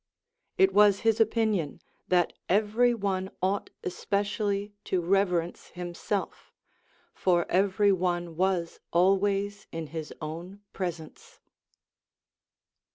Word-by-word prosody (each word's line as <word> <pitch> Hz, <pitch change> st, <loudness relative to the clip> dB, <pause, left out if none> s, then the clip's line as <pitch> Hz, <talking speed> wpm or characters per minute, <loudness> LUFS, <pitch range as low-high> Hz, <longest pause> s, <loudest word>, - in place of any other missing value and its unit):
It 190 Hz, 0 st, +4 dB
was 205 Hz, -1 st, +5 dB
his 225 Hz, 0 st, +2 dB
opinion 215 Hz, -8 st, +1 dB, 0.3 s
that 175 Hz, -2 st, +2 dB, 0.2 s
every 215 Hz, +5 st, +3 dB
one 195 Hz, -4 st, -1 dB
ought 195 Hz, +2 st, -1 dB
especially 200 Hz, +2 st, -1 dB
to 185 Hz, -, 0 dB
rever 180 Hz, 0 st, +2 dB
ence 170 Hz, +2 st, -10 dB
himself; 180 Hz, +3 st, -4 dB, 0.6 s
for 175 Hz, -2 st, +2 dB
every 200 Hz, +2 st, +3 dB
one 175 Hz, -2 st, -1 dB
was 180 Hz, -1 st, 0 dB
always 195 Hz, +3 st, +2 dB
in 165 Hz, -1 st, -4 dB
his 160 Hz, -2 st, -5 dB
own 170 Hz, +6 st, -7 dB
pres 175 Hz, -3 st, -2 dB
ence. 155 Hz, -1 st, -15 dB
190 Hz, 105 wpm, -28 LUFS, 175-205 Hz, 0.6 s, was